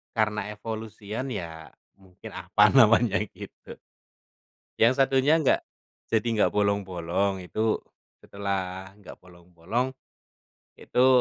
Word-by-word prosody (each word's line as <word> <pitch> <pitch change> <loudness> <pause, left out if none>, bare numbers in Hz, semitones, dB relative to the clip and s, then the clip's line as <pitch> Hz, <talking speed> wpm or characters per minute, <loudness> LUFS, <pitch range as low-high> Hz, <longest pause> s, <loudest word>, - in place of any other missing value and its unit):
karena 105 -1 +1
evolusian 110 +2 -6
ya 105 -10 -4 0.5
mungkin, 95 -2 -13
apa - - +3
namanya 115 -3 +6 0.2
gitu - - -12 1.1
yang 115 +3 +5
satunya 135 +3 +3
nggak, 140 - +3 0.5
jadi 110 0 +2
nggak 105 - +3
bolong-bolong 95 -2 0
itu. 110 +5 -1 0.4
Setelah 95 -1 -4
nggak 100 - -12
bolong-bolong 90 +8 -4 0.8
itu 125 +1 +2
105 Hz, 95 wpm, -26 LUFS, 95-115 Hz, 1.1 s, namanya